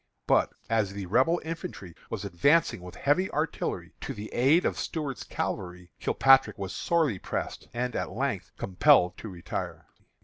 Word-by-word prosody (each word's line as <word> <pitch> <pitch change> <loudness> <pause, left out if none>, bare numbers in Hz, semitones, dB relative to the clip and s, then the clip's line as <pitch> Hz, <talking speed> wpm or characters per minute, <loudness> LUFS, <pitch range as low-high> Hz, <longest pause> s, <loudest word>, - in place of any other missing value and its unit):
But, - - +3 0.2
as 110 -4 +1
the 100 -1 -5
Rebel 130 - +3
infantry 160 - -6 0.2
was 105 -3 -4
advancing 100 - +2
with 90 0 -10
heavy 180 +7 +1
artillery 155 +2 -2
to - - -5
the 105 +1 -8
aid 140 +8 +4
of - - 0
Stuart's 150 -6 -3
cavalry, 90 -1 -4
Kilpatrick 135 -5 +4
was 95 -1 -5
sorely 155 - +1
pressed, - - -4
and, 125 +1 -2
at - - -2
length, - - -2
compelled 95 -2 +4
to 110 - -7
retire. 90 -2 -5
115 Hz, 150 wpm, -28 LUFS, 95-150 Hz, 0.2 s, aid